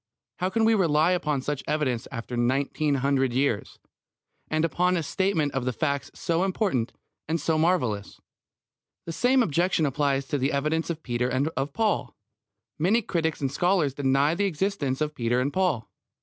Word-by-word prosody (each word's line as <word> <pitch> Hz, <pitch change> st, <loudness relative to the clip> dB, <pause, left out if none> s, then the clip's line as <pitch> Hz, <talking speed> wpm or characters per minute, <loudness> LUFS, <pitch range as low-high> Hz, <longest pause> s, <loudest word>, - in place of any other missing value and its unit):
How 185 Hz, -, 0 dB
can 225 Hz, +3 st, +1 dB
we 225 Hz, -, +5 dB
rely 165 Hz, -4 st, +3 dB
upon 150 Hz, -7 st, 0 dB
such 145 Hz, -1 st, -3 dB
evidence 130 Hz, -7 st, -1 dB
after 120 Hz, 0 st, -5 dB
nineteen 140 Hz, +4 st, +1 dB
hundred 135 Hz, -3 st, +2 dB
years, 130 Hz, -5 st, 0 dB, 0.7 s
and 155 Hz, +1 st, +1 dB
upon 180 Hz, +3 st, +1 dB
a 165 Hz, -, -1 dB
statement 165 Hz, -3 st, 0 dB
of 130 Hz, -1 st, -1 dB
facts 140 Hz, 0 st, -1 dB
so 170 Hz, +1 st, 0 dB
important 185 Hz, -, 0 dB, 0.4 s
and 165 Hz, +2 st, 0 dB
so 160 Hz, +2 st, 0 dB
marvellous? 125 Hz, -, 0 dB, 0.9 s
The 165 Hz, -, -4 dB
same 250 Hz, +8 st, +3 dB
objection 170 Hz, -1 st, +1 dB
applies 140 Hz, -1 st, 0 dB
to 145 Hz, -, 0 dB
the 135 Hz, +3 st, 0 dB
evidence 155 Hz, +4 st, 0 dB
of 160 Hz, -2 st, -4 dB
Peter 125 Hz, 0 st, -1 dB
and 130 Hz, +4 st, 0 dB
of 140 Hz, -2 st, -3 dB
Paul. 215 Hz, -, 0 dB, 0.6 s
Many 210 Hz, +9 st, +3 dB
critics 160 Hz, -5 st, -1 dB
and 135 Hz, -2 st, 0 dB
scholars 175 Hz, -3 st, +1 dB
deny 140 Hz, +2 st, +2 dB
the 200 Hz, +4 st, 0 dB
existence 165 Hz, -7 st, -1 dB
of 150 Hz, 0 st, 0 dB
Peter 120 Hz, -2 st, 0 dB
and 140 Hz, +3 st, -1 dB
Paul. 175 Hz, -, 0 dB
150 Hz, 165 wpm, -26 LUFS, 135-175 Hz, 0.9 s, we